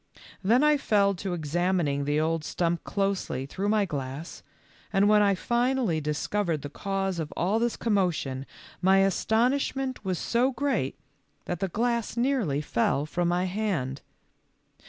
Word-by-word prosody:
Then 235 +8 +4
I 300 0 +5
fell 200 -6 +2
to 185 -1 -3
ex 155 -4 -6
amining 175 -5 +1
the 145 +1 +1
old 160 0 0
stump 170 +1 -1
closely 195 -10 -1
through 190 +8 -3
my 210 -1 +3
glass, 140 0 -6 0.5
and 195 +1 +3
when 210 0 +5
I 200 -1 +4
finally 240 -5 +1
discovered 155 +2 -1
the 145 - -6
cause 195 0 -2
of 155 -2 -4
all 195 +6 +1
this 235 0 0
commotion 175 - 0 0.3
my 190 +1 +5
astonishment 250 +6 +1
was 185 -2 -1
so 250 +8 +1
great 245 - -1 0.5
that 175 - -3
the 195 - 0
glass 235 +4 -1
nearly 235 - +1
fell 140 0 0
from 175 +3 -1
my 175 +1 +1
hand. 180 -10 -2
190 Hz, 150 wpm, -27 LUFS, 160-220 Hz, 0.5 s, I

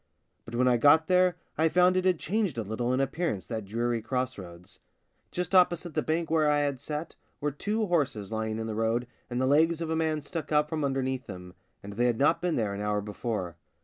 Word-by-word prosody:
But 115 - -7
when 125 +1 +3
I 125 -1 +4
got 145 +5 +5
there 180 0 +3 0.2
I 160 +1 +4
found 180 +2 +4
it 185 0 +1
had 185 -2 +3
changed 195 - -1
a 115 - -1
little 110 +4 -2
in 130 - +1
appearance, 135 - -1
that 110 -3 -5
dreary 115 +3 -1
cross 125 +2 -2
roads. 90 +1 -11 0.5
Just 180 +1 -4
opposite 175 -2 +3
the - - +1
bank 160 +1 -1
where 155 -2 +3
I 145 0 +3
had 140 -3 -2
sat 155 +2 -5 0.3
were 150 0 -1
two 210 +9 -1
horses 140 - -1
lying 110 0 -2
in 110 - -3
the 110 - -3
road 115 +2 0 0.2
and 120 0 -2
the 130 - +2
legs 160 +4 +3
of 165 -1 -3
a - - +1
man 160 -1 0
stuck 155 0 -6
out 150 0 +3
from 155 -2 -2
underneath 130 -1 -1
them, 90 0 -9 0.3
and 100 0 -8
they 120 +4 +1
had 120 -2 +1
not 145 +6 +3
been 175 -2 0
there 105 -3 -1
an 100 - -5
hour 105 0 0
before. 105 -4 -4
135 Hz, 230 wpm, -28 LUFS, 110-160 Hz, 0.5 s, got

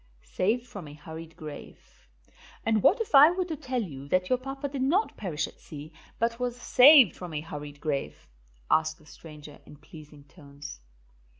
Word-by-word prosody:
SAVED 225 +6 -1
FROM 200 -9 -9
A 145 - -11
HURRIED 160 +2 -10
GRAVE. 150 - -12 0.6
"And 220 -2 +2
what 410 - +4
if 455 - -4
I 285 +2 +9
were 365 +1 -1
to 330 -3 -4
tell 255 -5 -3
you 140 -7 -9
that 185 +4 0
your 255 - +2
papa 270 +2 -5
did 275 -1 -5
not 340 +12 +1
perish 165 -7 -3
at - - -13
sea, 150 +1 -11 0.2
but 230 +1 -1
was 245 0 -3
saved 260 - +7
from 175 -4 -8
a 150 - -2
hurried 145 -2 -8
grave?" 145 -3 -4 0.4
asked 160 0 +2
the 155 - -22
stranger 150 -1 -13
in - - -14
pleasing 150 -1 -14
tones. 140 - -12
170 Hz, 180 wpm, -27 LUFS, -, 0.6 s, I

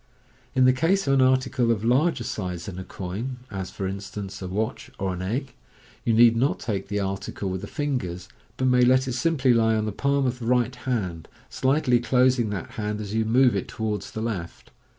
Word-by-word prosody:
In 130 -1 +5
the 130 - +6
case 175 +9 +2
of 135 - +2
an 135 - +4
article 130 -2 +2
of 110 -2 +1
larger 130 +3 +2
size 90 -7 -4
than 95 -2 -6
a - - -5
coin 100 +9 -5
— 130 - -26
as, 95 -3 -4
for 95 - -4
instance, 100 0 -6
a 95 - -4
watch 110 +7 -3
or 95 -2 -1
an 90 - -5
egg 120 +7 -3 0.3
— - - -27
you - - +3
need 115 +1 +6
not 130 +5 +1
take 100 -4 -3
the 105 +1 -1
article 95 0 -3
with 95 0 -3
the - - -6
fingers, 90 -12 -3 0.3
but 130 - 0
may 125 -1 +4
let 130 +1 +4
it 125 - -2
simply 130 -1 +2
lie 115 -1 +3
on 110 -1 0
the 110 - -2
palm 140 +5 +1
of 125 0 -1
the 115 - -5
right 125 0 +2
hand, 100 -11 -3 0.2
slightly 130 -2 +2
closing 125 0 +3
that 100 -4 -5
hand 105 -1 -3
as 105 -1 -5
you 110 0 +1
move 125 +1 +4
it 100 - -2
towards 110 -2 -3
the 110 - -5
left. 100 -7 -5
115 Hz, 220 wpm, -25 LUFS, 100-130 Hz, 0.3 s, the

